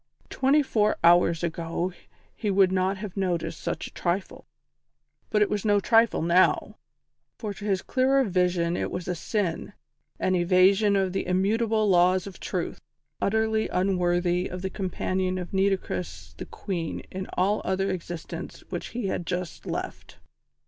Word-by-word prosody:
Twenty 280 +3 +3
four 215 -5 +1
hours 170 -1 +5
ago 170 +2 -2 0.4
he 215 - -2
would 190 -1 +4
not 190 +1 +1
have 200 -2 -7
noticed 180 -4 -2
such - - -3
a - - -10
trifle: 185 +2 -3 0.8
but 210 -1 +3
it - - +1
was 210 -2 -1
no 205 -1 +3
trifle 225 -2 +3
now; 175 +2 +3 0.6
for 210 -3 -4
to 205 +1 -9
his 195 -3 0
clearer 265 +1 +2
vision 180 -4 +1
it - - -2
was 180 -1 -5
a 180 - 0
sin, 185 +1 -2 0.5
an 185 - +1
evasion 185 +3 +4
of 190 -2 +1
the 195 - -2
immutable 215 +4 +1
laws 185 0 +4
of 195 -3 -9
Truth, - - -4 0.4
utterly 220 +1 +1
unworthy 180 -1 +1
of 180 +1 -7
the 190 - -2
companion 185 -1 -2
of 180 0 -6
Nitocris 90 - -1
the - - -8
Queen 170 -5 -4
in 190 0 -4
that - - -12
other 195 0 +1
existence 175 -2 -6
which - - -4
he 240 -2 -4
had 180 -2 -2
just 180 -2 -4
left. - - -5
185 Hz, 155 wpm, -26 LUFS, 175-205 Hz, 0.8 s, hours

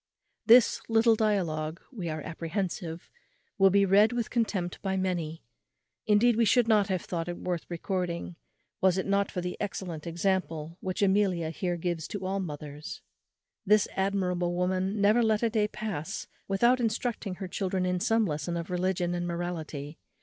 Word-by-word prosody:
This 240 0 +6
little 225 0 +5
dialogue, 170 -8 0
we 190 -10 -5
are 155 0 -3
apprehensive, 170 0 -4 0.5
will 195 0 +7
be 200 +1 +4
read 205 +4 +5
with 235 -2 -2
contempt 205 -7 -1
by 190 -1 -1
many; 175 -4 -2 0.6
indeed, 220 +3 +5
we 235 - +4
should 235 +2 +4
not 210 -3 +4
have 185 -3 -1
thought 170 -1 -3
it 175 - -4
worth 175 -2 -4
recording, 175 0 -3 0.5
was 190 -1 +4
it 190 - -1
not 200 0 +1
for 180 - -3
the 180 0 -3
excellent 180 -6 -4
example 170 -2 -1
which 185 +2 -2
Amelia 190 -5 +2
here 175 +1 -2
gives 170 -2 -2
to 195 -2 -5
all 195 +1 -1
mothers. 150 -4 -7 0.6
This 210 +1 +4
admirable 180 -3 0
woman 185 +3 0
never 210 +4 +4
let 220 -1 +2
a 230 - +2
day 210 -2 +2
pass 205 -4 -4 0.2
without 235 +6 +3
instructing 225 -3 -2
her 190 - -6
children 185 0 -1
in 180 0 0
some 225 +4 +2
lesson 155 +1 -2
of 170 +2 -5
religion 180 -1 0
and 175 0 -2
morality. 165 -4 -5
185 Hz, 165 wpm, -29 LUFS, 170-205 Hz, 0.6 s, will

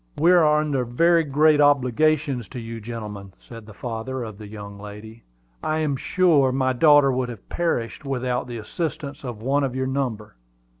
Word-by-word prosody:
"We 170 +4 +4
are 155 -4 +5
under 145 -4 0
very 165 +8 +3
great 150 +1 +3
obligations 145 -2 +2
to 125 - -8
you, 115 0 -7
gentlemen," 105 -4 -7
said 115 -2 -12
the 110 - -11
father 120 +3 -5
of 110 -3 -8
the 105 - -9
fair 105 - -13
young 100 -1 -9
lady. 105 +2 -10 0.4
"I 155 - 0
am 155 -3 0
sure 150 -3 +3
my 130 0 +1
daughter 145 0 +5
would 125 -1 -1
have 115 -5 -10
perished 150 -8 -2
without 125 -3 -2
the 120 -1 -6
assistance 145 +4 -5
of 120 -4 -7
one 140 +3 +1
of 130 -2 -2
your 130 0 -1
number." 125 - -3
130 Hz, 185 wpm, -23 LUFS, 115-145 Hz, 0.4 s, are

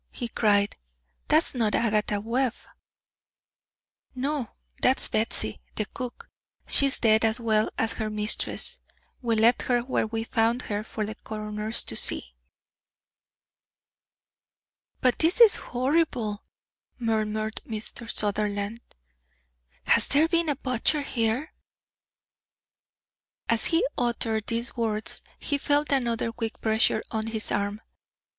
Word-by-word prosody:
he 240 - -5
cried. 205 -3 +2 0.5
"That's 310 +2 +3
not 225 -5 +1
Agatha 210 -2 +1
Webb." 240 +3 0 1.6
"No, 265 -2 -2 0.3
that's 260 - +3
Batsy, 215 - 0 0.2
the 215 - -1
cook. 250 +3 -7 0.4
She's 275 -1 +3
dead 220 -1 +4
as 225 +2 +2
well 220 -2 +1
as 225 - +1
her 215 -1 -3
mistress. 210 0 -2 0.4
We 235 -2 +1
left 225 +3 +4
her 245 -1 +1
where 245 -2 -1
we 225 0 -3
found 230 +2 +1
her 205 0 -3
for 215 -1 -4
the 215 - -5
coroner 215 0 -6
to 110 - +2
see." - - +3 2.7
"But 255 -1 +2
this 330 +8 +3
is 460 -3 +8
horrible," 250 -5 -1 0.5
murmured 220 -2 -1
Mr. 225 +1 -4
Sutherland. 205 +1 -1 1.1
"Has 230 - +4
there 295 +3 +3
been 335 -1 +1
a 290 - +1
butcher 260 +3 0
here?" 240 +3 -1 1.9
As 230 -1 +4
he 330 - +3
uttered 225 -3 0
these 235 +1 -2
words, 220 -3 -2 0.2
he 285 -1 -1
felt 290 +1 +1
another 235 -4 0
quick 225 -1 -5
pressure 220 0 +2
on 220 0 -2
his 225 -1 -2
arm. 205 +1 -1
225 Hz, 120 wpm, -26 LUFS, 215-250 Hz, 2.7 s, is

